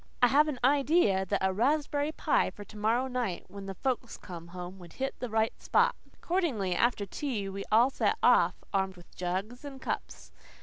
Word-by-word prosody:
I 245 - +5
have 295 +4 +5
an 295 -4 -2
idea 270 - +3
that 195 0 0
a 190 - +2
raspberry 290 +6 +1
pie - - +1
for 205 - -10
to 205 - -15
morrow 225 +4 +1
night, 245 -8 -3
when 200 0 -8
the 195 - -5
folks 245 +1 -2
come 170 -3 -9
home, 180 +2 -8
would 175 -2 -12
hit 270 0 -2
the 250 - -4
right 220 0 +1
spot." - - +3 0.2
Accordingly, 280 - 0
after 235 -4 +2
tea 215 -1 -3
we 195 +1 -5
all 235 +5 +5
set 430 - +1
off, - - +5 0.2
armed 190 -1 0
with 175 - -17
jugs 190 +8 -3
and 280 -2 -8
cups. - - -5
225 Hz, 190 wpm, -30 LUFS, 190-270 Hz, 0.2 s, I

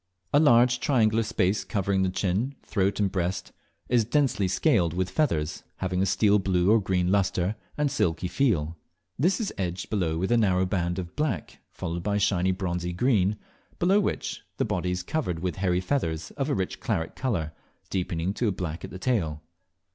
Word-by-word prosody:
A 145 - +6
large 120 -4 +5
triangular 115 -6 +3
space 105 -3 0
covering 100 -2 0
the 95 - +2
chin, 100 +9 -1
throat, 100 -1 0
and 100 -2 +1
breast, 95 0 -2 0.4
is 120 -2 +3
densely 120 -5 +1
scaled 90 -2 +2
with 90 0 -1
feathers, 80 - 0
having 90 -1 -1
a 95 - +2
steel 105 +1 +3
blue 95 0 +2
or 110 0 +5
green 90 -1 +1
lustre, 95 0 +1 0.2
and 150 0 +2
a - - -3
silky 90 -4 0
feel. 85 - +1 0.4
This 180 - +2
is 220 - -2
edged 90 -1 -3
below 85 -7 0
with 95 +5 -1
a 120 - +5
narrow 95 -4 +3
band 90 -2 -1
of 90 -2 -6
black, 135 - -2
followed 85 +1 -4
by 100 +3 0
shiny 95 -2 +2
bronzy 90 -1 -2
green, 105 -1 +2 0.4
below 190 +4 +4
which 205 - -2 0.2
the - - +1
body 90 - -1
is 90 0 -2
covered 135 - -2
with 90 +2 -3
hairy 90 -2 +1
feathers 80 - -2
of 140 +1 -3
a - - +1
rich 95 -2 -2
claret 80 0 -2
colour, 85 -12 -2 0.4
deepening 90 -1 -1
to 115 -1 0
black 85 -3 -4
at - - -6
the - - -8
tail. 85 -10 -1
95 Hz, 185 wpm, -27 LUFS, 90-115 Hz, 0.4 s, A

